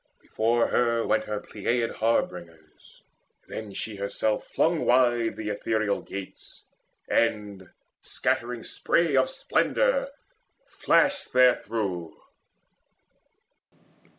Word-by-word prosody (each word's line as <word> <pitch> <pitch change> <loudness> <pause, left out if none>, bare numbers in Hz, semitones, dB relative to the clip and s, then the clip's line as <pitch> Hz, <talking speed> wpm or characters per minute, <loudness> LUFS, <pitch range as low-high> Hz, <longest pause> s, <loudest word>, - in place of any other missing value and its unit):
Before 115 +2 +1
her 115 -1 +1
went - - +1
her 105 -1 -3
Pleiad 115 +3 -2
harbingers, 85 -8 -3 0.4
Then 110 -2 -7
she 110 -2 -5
herself 105 +2 -2
flung 165 0 +1
wide 120 -2 +3
the 105 -1 -5
ethereal 105 0 -1
gates, 100 -1 -9 0.4
And, 105 -5 -1 0.3
scattering 120 -1 -2
spray 170 0 +1
of - - +3
splendour, - - +1 0.6
flashed 285 -1 +1
there 125 0 +6
through. 95 -7 -4
115 Hz, 95 wpm, -26 LUFS, 100-125 Hz, 0.6 s, there